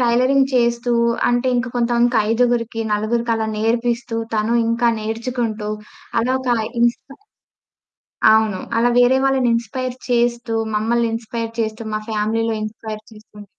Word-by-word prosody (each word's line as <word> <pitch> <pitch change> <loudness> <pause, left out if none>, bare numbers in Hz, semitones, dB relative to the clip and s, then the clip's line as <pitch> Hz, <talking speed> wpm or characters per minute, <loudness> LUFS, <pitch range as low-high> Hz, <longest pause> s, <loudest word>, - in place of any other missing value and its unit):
Tailoring 255 +3 +3
చేస్తూ 240 0 +1 0.4
అంటే 245 +1 +1
ఇంక 245 +1 -1
కొంతమందికి 240 0 +2
ఐదుగురికి, 230 -1 +1
నలుగురికి 230 +3 0
అలా 220 0 -1
నేర్పిస్తూ, 235 +1 -1 0.2
తను 215 +2 +1
ఇంక 230 +1 -1 0.2
నేర్చుకుంటూ 225 0 -3 0.5
అలా 245 +3 0
ఒక 260 - -5 0.3
ఇన్స్‌పై 240 +3 0 1.2
అవును. 220 -3 +2 0.2
అలా 240 +1 +3
వేరే 245 +2 +5
వాళ్ళని 265 -2 +2
ఇన్స్‌పై‌ర్ 250 +2 -4
చేస్తూ, 235 -1 +1 0.2
మమ్మల్ని 230 +2 +1
ఇన్స్‌పై‌ర్ 230 0 -5
చేస్తూ, 220 0 -2
మా - - -1
ఫ్యామిలీలో 220 +1 0
ఇన్స్‌పై‌ర్ 215 0 -7
చేస్తుంది. 210 -1 -14
235 Hz, 125 wpm, -20 LUFS, 220-245 Hz, 1.2 s, వేరే